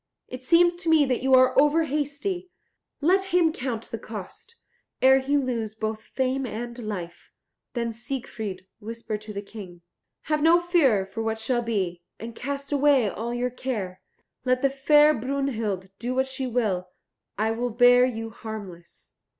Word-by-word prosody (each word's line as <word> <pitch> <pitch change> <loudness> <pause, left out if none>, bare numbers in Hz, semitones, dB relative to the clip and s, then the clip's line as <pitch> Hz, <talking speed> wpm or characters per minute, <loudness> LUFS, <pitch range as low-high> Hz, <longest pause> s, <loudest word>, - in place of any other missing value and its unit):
It 255 0 -8
seems 345 +5 +5
to 350 -2 -2
me 315 -2 +5
that 255 -2 0
you 265 0 +5
are 255 0 +5
over 300 +3 +3
hasty; 305 +5 -2 0.5
let 375 +6 +3
him 345 -4 +2
count 245 -5 -4
the 230 - -4
cost, 220 - -9 0.4
ere 265 +1 +6
he 280 +2 +1
lose 235 -5 -2
both 220 0 -3
fame 260 +3 -1
and 235 +2 -5
life." 185 -7 -6 0.4
Then 235 -2 -2
Siegfried 220 -6 -5
whispered 220 -1 -5
to 215 0 -8
the 200 0 -5
King, 190 -5 -10 0.4
"Have 305 0 0
no 330 +3 +6
fear 310 - +3
for 210 +4 -6
what 225 0 -1
shall 240 +2 0
be, 190 -7 -2 0.2
and 230 +1 -7
cast 280 +2 -5
away 280 -5 +4
all 230 +4 -4
your 245 +1 -1
care. 210 -8 -4 0.4
Let 255 0 +1
the 275 - +3
fair 295 +2 +5
Brunhild 230 -7 -2
do 245 +2 -3
what 265 0 +2
she 265 0 -4
will, 210 -7 -1 0.5
I 220 +2 +1
will 240 +2 -1
bear 245 +2 +6
you 225 -3 -2
harmless." 205 -7 -9
245 Hz, 165 wpm, -25 LUFS, 220-275 Hz, 0.5 s, ere